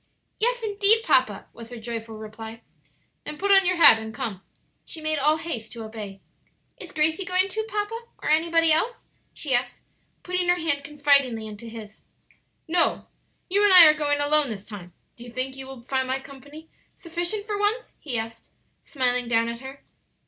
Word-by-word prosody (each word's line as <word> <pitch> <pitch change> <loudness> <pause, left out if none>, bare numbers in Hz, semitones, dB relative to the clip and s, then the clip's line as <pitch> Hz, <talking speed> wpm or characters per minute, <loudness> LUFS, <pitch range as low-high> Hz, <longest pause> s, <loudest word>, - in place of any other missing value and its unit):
"Yes 485 +1 0
indeed, 420 +1 +3
papa!" - - +2
was 230 -1 -11
her 245 - -8
joyful 225 -1 -6
reply. 220 +1 -10 0.6
"Then 300 - -7
put 400 +3 0
on 390 -2 +6
your 365 - +2
hat 290 -9 +8
and 220 0 -7
come." 205 -4 -5 0.4
She 325 - -5
made 310 -1 -1
all 300 +3 +3
haste 285 -10 -6
to 230 -2 -7
obey. 210 -3 -9 0.6
"Is - - -10
Gracie 315 +4 +1
going 370 +1 +1
too, 440 +3 -3
papa? 445 +2 -4
or - - -7
anybody 330 +1 +3
else?" 445 +11 0 0.3
she 285 -4 -3
asked, 245 0 0 0.4
putting 360 0 -1
her 355 - +5
hand 320 -5 -1
confidingly 280 -6 +2
into 215 +2 -9
his. 220 -2 -11 0.7
"No; 335 +1 +1 0.4
you 400 +3 +2
and 410 - +5
I 360 -3 +11
are 305 - +7
going 290 -1 0
alone 290 -1 +2
this 205 -2 -7
time; 190 -5 -10 0.2
do 235 - -12
you 240 - -11
think 255 +2 -4
you 265 0 -8
will 265 -3 -11
find 260 +1 -1
my 260 +1 -1
company 285 +4 -13 0.3
sufficient 345 +5 -4
for 415 -1 -3
once?" 430 +4 -1
he 255 -6 -3
asked, 225 0 -7 0.3
smiling 250 -3 -1
down 230 0 +1
at 235 0 -6
her. 265 +2 -11
285 Hz, 185 wpm, -24 LUFS, 235-350 Hz, 0.7 s, I